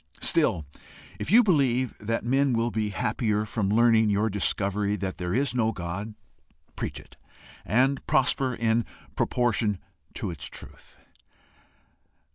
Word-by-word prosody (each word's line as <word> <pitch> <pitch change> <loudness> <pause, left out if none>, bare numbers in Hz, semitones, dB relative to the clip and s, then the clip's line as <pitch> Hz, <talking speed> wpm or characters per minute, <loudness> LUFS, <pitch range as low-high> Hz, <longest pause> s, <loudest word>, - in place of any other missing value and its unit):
Still, 80 - +2 0.5
if - - -3
you 235 +6 +7
believe 130 - +2
that 115 +2 -2
men 135 +2 +2
will 115 +1 0
be 110 -1 -1
happier 105 +2 -1
from 105 -2 -1
learning 110 0 +4
your 105 +2 +1
discovery 100 +1 0
that 95 -2 -4
there 90 -1 -3
is 135 +1 +2
no 115 -3 +1
God, 100 +4 -5 0.6
preach - - -4
it, - - -17 0.5
and 130 +6 +2
prosper 130 -1 +2
in 115 0 +1 0.3
proportion 115 -4 +1 0.4
to - - -3
its 75 -3 -6
truth. - - -10
110 Hz, 130 wpm, -26 LUFS, 100-125 Hz, 0.6 s, you